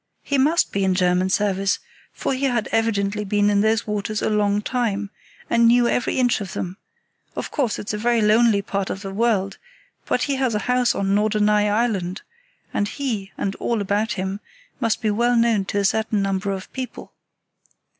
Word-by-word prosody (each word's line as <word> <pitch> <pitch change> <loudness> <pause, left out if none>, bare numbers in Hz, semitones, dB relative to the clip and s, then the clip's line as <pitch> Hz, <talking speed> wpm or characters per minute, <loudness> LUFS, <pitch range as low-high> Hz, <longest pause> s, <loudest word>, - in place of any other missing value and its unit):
He 280 -1 0
must 310 +6 +3
be 200 - 0
in 190 -1 +2
German 180 0 +2
service, 195 -1 +1 0.3
for - - -2
he 265 +1 -1
had 240 -4 0
evidently 210 -2 0
been 205 +1 +2
in 200 0 +3
those 220 +2 +2
waters 210 0 -2
a - - +1
long 205 -1 +2
time, 210 -5 -1 0.4
and 235 0 +4
knew 240 +1 +5
every 245 - 0
inch 245 -3 +2
of 195 - -6
them; 185 +1 -4 0.6
of - - -5
course, 255 -7 0
it's 210 - -5
a 210 - -3
very 235 +1 +2
lonely 215 -1 +4
part 195 0 -2
of 190 - -5
the 195 0 -6
world, 205 -3 0 0.5
but - - +1
he 280 -2 -1
has 260 -4 0
a 210 - -2
house 250 0 +2
on 195 0 0
Norderney 210 0 +2
Island; 205 -4 -1 0.5
and 205 - 0
he, 220 -7 -4
and 195 - -2
all 235 -2 -1
about 205 +3 0
him, 190 +1 -3 0.4
must 230 -4 0
be 215 - +2
well 240 +3 +2
known 230 -4 +2
to 200 - -3
a 200 - +1
certain 215 0 +1
number 195 0 -1
of 190 -1 -5
people. 260 -1 -7
210 Hz, 190 wpm, -22 LUFS, 200-235 Hz, 0.6 s, knew